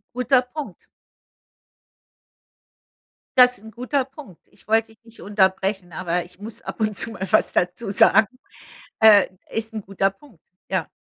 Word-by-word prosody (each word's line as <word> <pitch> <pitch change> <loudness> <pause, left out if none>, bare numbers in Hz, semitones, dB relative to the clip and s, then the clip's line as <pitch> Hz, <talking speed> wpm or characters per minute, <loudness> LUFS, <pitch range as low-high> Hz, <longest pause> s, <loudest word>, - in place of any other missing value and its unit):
Guter 250 +1 +3
Punkt. 250 - -9 2.5
Das 250 0 +6
ist 210 - -19
'n 220 - -10
guter 255 +5 -2
Punkt. 265 - -14
Ich - - -25
wollte 225 +1 +2
dich 220 +1 -22
nicht 230 0 -14
unterbrechen, 190 -2 0
aber 175 +1 -2
ich 180 +1 -17
muss 220 +2 -8
ab - - -8
und 215 -2 0
zu 230 - 0
mal 190 - -5
was 215 - +3
dazu 180 +4 -1
sagen. 215 +2 +5 0.7
Äh, 215 -3 +7 0.2
ist 225 0 -4
'n 215 - -4
guter 195 0 0
Punkt, 195 - -21 0.3
ja. 185 -4 -1
215 Hz, 155 wpm, -22 LUFS, 190-235 Hz, 2.5 s, Äh